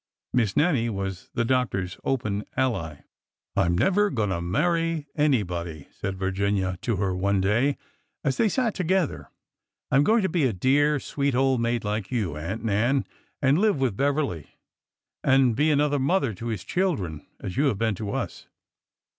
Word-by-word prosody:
Miss 110 -6 +1
Nannie 140 -8 +3
was 95 -3 -4
the 115 - +1
doctor's 115 -8 0
open 110 -6 -1
ally. 85 - -1 0.3
'' - - -62
I - - +3
'm 85 0 +1
never 205 - +3
going 110 - -1
to 85 -2 -1
marry 165 - 0
anybody," 90 - -1
said 95 -1 -5
Virginia 95 -1 -1
to 115 - 0
her, 95 -1 -1
one 100 +1 +1
day, 115 +9 +2 0.5
as 135 -3 0
they 220 - +3
sat 235 -1 0
together. 185 -2 -1 0.3
" - - -58
I - - +4
'm 140 - +5
going 220 +5 +3
to - - +3
be 160 -4 +1
a 125 - +1
dear, 145 +8 +3
sweet 140 -1 -1
old 130 -1 +2
maid 115 0 0
like 105 -1 -2
you. 105 - -1
Aunt 95 +9 -4
Nan, 115 +6 +2 0.4
and 140 +4 +4
live 210 -7 +2
with 130 -7 +1
Beverly, 140 - 0 0.8
and 130 -3 +4
be 150 +5 +3
another 145 -1 +2
mother 135 - +1
to 115 +5 -7
his 110 -6 -3
children, 105 - -1 0.2
as 90 - -6
you 140 +4 +2
have 130 -8 +1
been 110 +1 +1
to 100 +1 -5
us." - - -4
120 Hz, 180 wpm, -25 LUFS, 95-145 Hz, 0.8 s, m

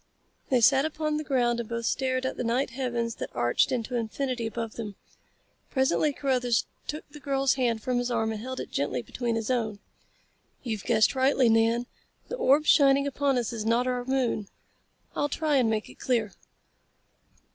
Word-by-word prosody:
They 255 -3 +3
sat 265 +3 +5
upon 305 0 -1
the 305 - -3
ground 240 -4 +1
and 235 - -5
both 235 0 -3
stared 260 0 0
out 260 - 0
at - - -15
the - - -2
night 245 +3 0
heavens 235 -2 -2
that - - -5
arched 120 0 +2
into 245 0 -2
infinity 240 +1 -2
above 225 0 -4
them. 210 -3 -6 0.7
Presently 265 +2 +2
Carruthers 250 -4 +1 0.2
took 300 - -5
the 300 - -11
girl's 275 -1 +1
hand 235 -4 0
from 250 -1 0
his 245 0 -1
arm 225 -2 0
and 215 -1 -5
held 260 +2 -5
it - - -6
gently 130 -3 -1
between 235 - -2
his 225 +2 -2
own. 220 -4 -1 0.9
"You've 220 -6 -4
guessed 220 -3 +3
rightly, 265 -2 +3
Nan. 225 +2 +3 0.4
The - - -3
orb 300 - +4
shining 275 -1 +5
upon 280 -1 0
us 240 -1 -1
is 220 -2 -3
not 230 +3 +2
our 250 -1 -1
moon. 245 -5 0 0.7
I'll 290 - 0
try 300 0 +1
and 245 -4 +3
make 215 -1 -1
it - - -15
clear." 230 -5 0
245 Hz, 185 wpm, -27 LUFS, 230-270 Hz, 0.9 s, sat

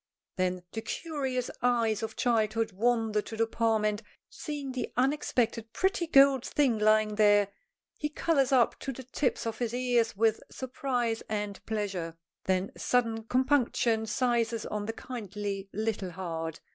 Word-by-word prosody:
Then 185 -1 -1
the 220 - -4
curious 265 -4 -3
eyes 230 -3 +2
of 220 - -4
childhood 225 -2 +1
wander 220 +1 +1
to 220 - -8
the 225 - +3
palm, 225 -1 +1
and, 210 0 0 0.3
seeing 290 -3 -5
the 255 -1 -4
unexpected 245 -4 0
pretty 375 -2 +1
gold 275 -4 +6
thing 265 -7 +1
lying 215 0 +3
there, 205 -2 +5 0.5
he 300 - -1
colors 290 -3 +1
up 250 -3 +3
to 270 - -4
the 260 0 -8
tips 260 +1 -1
of 225 -1 -3
his 240 -1 -1
ears 245 -4 +1
with 225 0 +2
surprise 250 -4 -2
and 210 -2 -3
pleasure. 195 -7 -3 0.3
Then 185 +1 0
sudden 230 -3 0
compunction 245 -3 +2
seizes 230 0 0
on 210 -1 -3
the 225 - -2
kindly 205 -5 -5
little 215 -2 -2
heart. 165 -3 -5
225 Hz, 145 wpm, -29 LUFS, 210-255 Hz, 0.5 s, gold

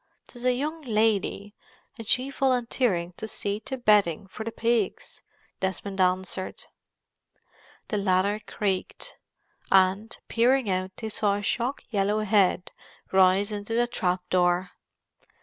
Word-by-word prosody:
"'Tis 240 -1 -11
a 255 - +4
young 305 +6 -3
lady, 210 -4 0 0.4
and 225 -3 -9
she 255 +3 +1
volunteering 245 -9 0
to 220 - -5
see 205 -1 -3
to 265 +4 -6
bedding 205 -8 +3
for 200 +3 -8
the 230 - -4
pigs!" 230 -3 -1 0.4
Desmond 190 +1 -2
answered. 185 +1 -1 1.3
The 210 - -1
ladder 200 +1 +1
creaked, 195 -2 -3 0.5
and, 195 +3 +3
peering 245 +1 +2
out, 185 0 -1
they 220 - -5
saw 205 -1 +1
a 205 - -4
shock 245 +6 -1
yellow 205 0 +1
head 195 -3 +2 0.4
rise 190 +2 +4
into 210 +2 -4
the 240 +1 +3
trap 180 -7 -2
door. 180 0 +2
205 Hz, 130 wpm, -26 LUFS, 190-230 Hz, 1.3 s, a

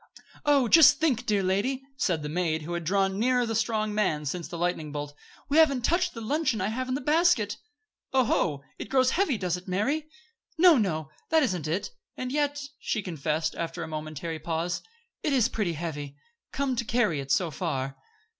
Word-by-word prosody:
"Oh! 285 -4 +4
Just 320 +6 +7
think, 255 -6 +1
dear 205 -2 +2
lady," 205 +9 0
said 175 - 0
the - - -3
maid, 160 -1 -1
who 170 +3 -5
had 170 0 -3
drawn 195 +3 +1
nearer 250 +1 +2
the 225 - -2
strong 215 -1 0
man 170 -8 0
since 170 +2 -3
the 170 - -7
lightning 165 -3 -1
bolt. 145 0 -5 0.3
"We 285 - +1
haven't 280 -6 +5
touched 355 -1 +1
the 230 - -6
luncheon 275 0 0
I 190 +1 0
have 255 +3 -3
in 255 - 0
the 280 - -3
basket." 295 - +2 0.5
"Oho, 175 - +1 0.2
it - - -6
grows 260 -1 +3
heavy, 345 - +1
does 180 -3 -1
it, 180 - -13
Mary?" 270 +12 0 0.5
"No, 350 0 +7
no; 160 - -1 0.2
that 320 -1 +4
isn't 180 - -1
it. 170 +6 -2 0.3
And 255 0 -4
yet," 290 0 0 0.2
she 215 - -2
confessed, 160 -2 -2
after 170 0 -4
a - - -6
momentary 155 +1 -5
pause, 165 +2 -2 0.4
"it 300 - 0
is 245 -4 +4
pretty 200 -6 -1
heavy, 145 -3 -5 0.4
come 275 -2 -1
to 235 - 0
carry 215 -9 +1
it 135 0 -6
so 170 +3 +2
far." 135 -4 -3
200 Hz, 190 wpm, -27 LUFS, 165-260 Hz, 0.5 s, Just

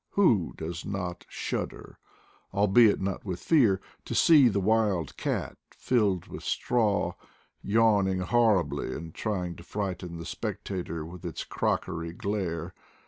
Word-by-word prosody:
Who 115 - +3
does 85 +2 -5
not 95 -3 -4
shud - - -2
der, - - -14 0.5
albeit 105 +2 +5
not 95 -1 -3
with 90 -3 -4
fear, 115 - +4 0.3
to - - -4
see 150 -6 +7
the 100 -3 +1
wild 100 -5 +1
cat, - - -3
filled 105 -8 0
with - - -8
straw, 110 -5 +1 0.5
yawning 100 -3 +3
horribly, 100 - +2
and 80 +1 -7
trying 90 -5 -3
to - - -11
frighten 95 -3 -4
the 85 - -7
spectator 85 -4 -4
with 85 +2 -10
its 85 -2 -4
crockery 85 0 -2
glare! 90 -3 -3
95 Hz, 135 wpm, -28 LUFS, 85-105 Hz, 0.5 s, see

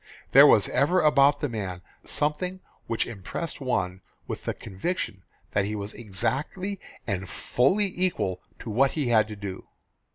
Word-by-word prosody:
There - - +9
was - - +6
ever 175 +7 +3
about 145 -1 +5
the 145 - +1
man 95 -7 -5 0.2
something 180 +5 -1 0.3
which 115 -1 0
impressed 120 - -5
one 95 -8 -1 0.2
with - - -6
the - - -1
conviction 100 - -3 0.3
that 100 -1 +1
he 105 +1 -3
was 100 +1 -5
exactly 145 - -2 0.3
and 95 -3 -2
fully 190 +10 +1
equal 170 - -1 0.2
to 115 - -5
what 135 +5 +3
he 145 -6 -1
had 110 -2 +4
to 105 - -7
do. 100 -2 -7
120 Hz, 155 wpm, -27 LUFS, 100-150 Hz, 0.3 s, There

